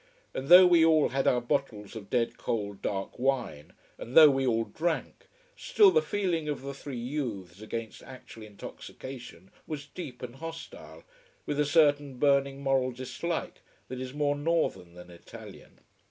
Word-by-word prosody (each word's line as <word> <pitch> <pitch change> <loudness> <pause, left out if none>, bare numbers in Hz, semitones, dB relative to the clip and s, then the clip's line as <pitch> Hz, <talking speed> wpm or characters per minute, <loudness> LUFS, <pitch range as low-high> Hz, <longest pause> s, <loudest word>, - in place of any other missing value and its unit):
And 135 - -5
though 180 +3 +10
we 175 -2 +5
all 160 -2 +4
had 135 +1 -1
our 125 - +3
bottles 120 -6 -3
of 100 -3 -9
dead 120 -2 0
cold 100 -3 -3
dark 95 +4 -4
wine, 120 - -2 0.3
and 120 - -4
though 155 -2 +10
we 135 -1 0
all 115 -1 +2
drank: 165 +7 -4 0.3
still, 410 -3 +4
the 470 - +3
feeling 180 - -2
of 145 -2 -4
the 140 0 -5
three 140 -1 -8
youths 115 - -5
against 110 0 -6
actual 125 -3 -12
intoxication 110 -1 -10 0.2
was 145 -2 -5
deep 140 -5 -9
and 125 +1 -8
hostile, 165 +2 -9 0.4
with 145 - -3
a 150 - +3
certain 145 -3 +2
burning 140 0 +1
moral 135 -2 +1
dislike 130 +7 -5 0.3
that 130 0 -6
is 130 -1 -5
more 145 0 0
northern 145 - -1
than 90 0 -12
Italian. 85 - -13
135 Hz, 160 wpm, -28 LUFS, 115-150 Hz, 0.4 s, though